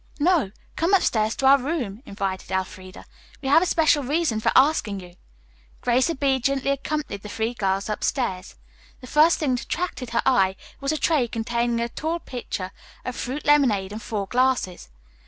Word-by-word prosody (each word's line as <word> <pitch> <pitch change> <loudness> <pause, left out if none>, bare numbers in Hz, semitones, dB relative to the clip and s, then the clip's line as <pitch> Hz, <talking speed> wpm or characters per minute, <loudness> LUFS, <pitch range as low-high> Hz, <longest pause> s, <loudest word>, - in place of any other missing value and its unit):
"No; 320 - +3 0.3
come 345 +5 +3
upstairs 220 - +1
to 270 - -2
our 275 +1 +7
room," 250 -7 -3
invited 195 -2 -4
Elfreda. 185 0 -5 0.3
"We 270 - -3
have 290 - +6
a 365 - +1
special 310 -3 +3
reason 285 -4 0
for - - +1
asking 260 -8 +3
you." 180 -1 -12 0.7
Grace 250 +4 +2
obediently 275 -2 +1
accompanied 275 -6 -3
the 210 - -9
three 225 +3 -2
girls 195 -3 -1
upstairs. 210 -3 -2 0.5
The - - -9
first 305 +6 +4
thing 285 -5 0
that 250 - -3
attracted 335 -9 -3
her 235 - 0
eye 195 -8 +3 0.2
was 275 +1 -1
a 310 - 0
tray 295 -6 +2
containing 235 +1 -1
a 235 - 0
tall 320 +7 -3
pitcher 225 - -5 0.3
of 255 - -4
fruit 270 +4 -4
lemonade 240 -10 +3
and 215 +2 -6
four 210 -2 -3
glasses. 245 - 0
250 Hz, 170 wpm, -24 LUFS, 210-290 Hz, 0.7 s, our